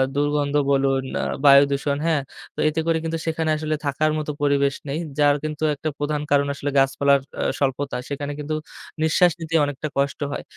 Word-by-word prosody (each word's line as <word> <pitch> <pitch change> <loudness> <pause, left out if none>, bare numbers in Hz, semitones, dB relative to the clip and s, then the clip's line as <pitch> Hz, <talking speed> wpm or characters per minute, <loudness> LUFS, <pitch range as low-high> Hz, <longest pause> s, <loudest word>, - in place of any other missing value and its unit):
দুর্গন্ধ 145 0 0 0.2
বলুন, 135 -1 +2 0.2
আ - - -2 0.2
বায়ুদূষণ 140 0 +5
হ্যাঁ? 160 -3 +2 0.3
তো - - -9
এতে 155 +1 -2
করে 165 -1 +3
কিন্তু 165 0 -2
সেখানে 160 -1 -1
আসলে 155 0 -2
থাকার 150 +2 +1
মত 155 - -4
পরিবেশ 140 -1 +2
নেই। 140 +3 -2 0.2
যার 145 -1 +5
কিন্তু 155 0 -4
একটা 155 +2 -3
প্রধান 145 0 -1
কারণ 140 0 +4
আসলে 140 0 -4
গাছপালার 140 +1 +3
এ্যা - - -5 0.2
স্বল্পতা। 140 0 -1
সেখানে 145 0 -4
কিন্তু 150 +1 -3 0.5
নিঃশ্বাস 175 +3 +4
নিতেই 165 0 0
অনেকটা 145 +1 -4
কষ্ট 140 0 0
হয়। - - -4
145 Hz, 175 wpm, -23 LUFS, 140-155 Hz, 0.5 s, বায়ুদূষণ